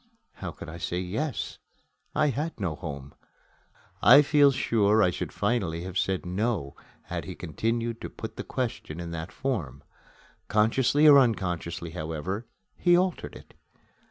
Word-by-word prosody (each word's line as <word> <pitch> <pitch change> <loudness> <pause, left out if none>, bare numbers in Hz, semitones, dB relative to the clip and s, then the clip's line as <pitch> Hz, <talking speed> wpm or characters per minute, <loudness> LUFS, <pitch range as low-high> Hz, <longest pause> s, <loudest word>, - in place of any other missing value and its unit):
How 95 - -6
could 85 - -9
I 80 +2 -8
say, 90 +1 -2
"Yes"? 110 +10 -3 0.6
I 150 0 +3
had 150 +4 -3
no 95 -6 -1
home. 70 -4 -7 0.9
I 145 - +8
feel 145 -1 +5
sure 110 -5 +3
I 90 - +3
should - - -4
finally 100 -6 -1
have 90 0 -7
said, 95 -1 0
"No", 95 -5 -1 0.3
had - - -5
he - - -7
continued 115 +7 -2
to - - -5
put - - -8
the - - -5
question 115 -10 -4
in 85 -1 -5
that 80 -1 -5
form. 75 - -3 0.6
Consciously 125 +8 +3
or 145 -2 +10
unconsciously, 90 -8 -1
however, 90 +7 -4 0.3
he 175 -1 +4
altered 185 -1 -1
it. - - -14
100 Hz, 150 wpm, -27 LUFS, 85-125 Hz, 0.9 s, or